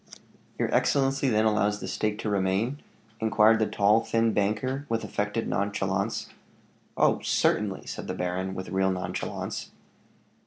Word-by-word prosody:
"Your - - -1
excellency 135 -1 +2
then 110 -1 +2
allows 105 -1 +2
the 95 - -6
stake 105 +2 -1
to 110 - -2
remain?" 100 +8 0 0.4
inquired 110 0 +4
the 110 - +2
tall, 105 +2 +3
thin 115 -1 +1
banker, 130 +8 -1
with 115 -1 -1
affected 105 +2 -2
nonchalance. 100 +2 -1 0.7
"Oh! - - +3
certainly," 100 -3 +1
said - - -6
the - - -3
baron, 90 +1 -2
with 95 -1 -6
real 95 +1 +1
nonchalance. 90 -1 -4
105 Hz, 140 wpm, -27 LUFS, 95-115 Hz, 0.7 s, inquired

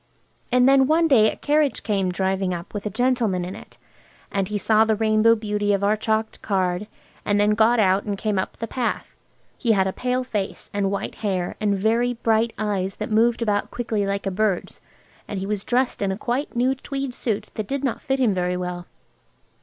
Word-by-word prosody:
And 250 +1 +5
then 270 -1 +5
one 325 +2 +3
day 220 -7 +5
a - - -8
carriage 295 -1 +1
came 195 -4 0
driving 190 0 -1
up 170 0 -9
with 205 0 -4
a - - -1
gentleman 225 -5 0
in 185 - -6
it, - - -13 0.5
and 195 -2 0
he 210 +1 -2
saw 215 +1 +4
the 220 -1 +2
rainbow 220 +1 +4
beauty 210 -2 -1
of 200 0 0
our 205 +2 +3
chalked 220 +1 -2
card, 190 -1 -1 0.4
and 205 0 +1
he 205 - +4
got 220 +3 +4
out 195 -1 +3
and 205 -2 -2
came 210 -1 -1
up 190 - -4
the 230 - -3
path. 240 +2 -3 0.5
He 230 -3 +3
had 190 -2 +2
a 190 - -1
pale 250 0 -1
face, 210 -6 -4
and 200 -1 0
white 200 - -3
hair 190 -4 -1
and 205 -2 +1
very 230 +4 +1
bright 225 0 +1
eyes 200 -2 -1
that 215 +1 -5
moved 230 +2 +3
about 205 -2 0
quickly 220 -4 -2
like 200 0 -2
a 195 - -1
birds, 195 -1 -1 0.5
and 205 - -4
he 190 - -3
was 205 0 -2
dressed 250 -1 0
in 195 -1 +1
a 190 - -3
quite 245 +6 -2
new 250 +2 +2
tweed 270 -1 -5
suit 215 -3 -3
that 215 -2 -4
did 275 +3 -3
not 265 - -1
fit 270 0 0
him 240 -6 +3
very 180 -1 -1
well. 180 -1 -5
215 Hz, 210 wpm, -23 LUFS, 195-240 Hz, 0.5 s, And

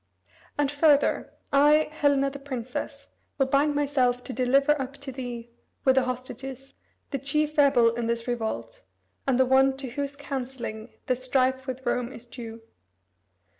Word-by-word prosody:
And 290 -1 +1
further, 290 -1 +3 0.2
I, 295 +2 +5
Helena 280 -2 +2
the 280 - -8
princess, 255 -3 -5 0.3
will 270 - +3
bind 280 +2 +2
myself 260 -4 +1
to 260 - -5
deliver 270 +3 +3
up 265 +1 -5
to 280 -1 -8
thee, 240 -2 -6 0.3
with 265 - +6
the 265 -1 +3
hostages, 255 +1 -6 0.4
the 275 - -1
chief 300 +3 0
rebel 250 -6 +5
in 235 -1 -2
this 235 0 -2
revolt, 220 - -3 0.4
and 260 -2 +2
the 260 - +6
one 265 +1 +4
to 265 -3 -6
whose 280 +2 -3
counselling 255 -5 -5 0.2
this 255 0 -1
strife 260 0 +1
with 260 0 -5
Rome 250 0 0
is 240 -3 -10
due." 230 -2 -9
265 Hz, 155 wpm, -26 LUFS, 245-280 Hz, 0.4 s, with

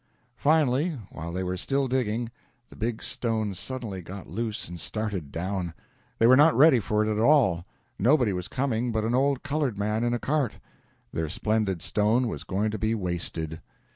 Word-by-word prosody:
Finally, 150 +1 +2
while 85 +1 -6
they 90 +2 -2
were 90 0 -2
still 135 +8 0
digging, 120 -2 -1 0.4
the - - -14
big 115 0 -3
stone 110 -4 -1
suddenly 105 0 -5
got 90 +2 -9
loose 110 +5 -3
and 85 0 -8
started 100 -10 -3
down. 90 -1 -3 0.4
They 115 - +3
were 125 +2 +8
not 150 +4 +6
ready 145 -2 +7
for 105 0 +1
it - - -2
at 105 - -1
all. 110 - +4 0.3
Nobody 125 -1 +4
was 90 -1 -4
coming 125 -3 -1
but 110 -1 0
an 115 - 0
old 135 +1 +2
colored 140 -6 -1
man 105 +2 0
in 120 0 +1
a - - -2
cart; 140 -3 0 0.6
their 80 -1 -2
splendid 105 -1 0
stone 110 +4 +2
was - - -5
going 105 +3 -1
to 110 - -4
be 110 +2 +1
wasted. 85 -4 -3
110 Hz, 180 wpm, -27 LUFS, 95-130 Hz, 0.6 s, were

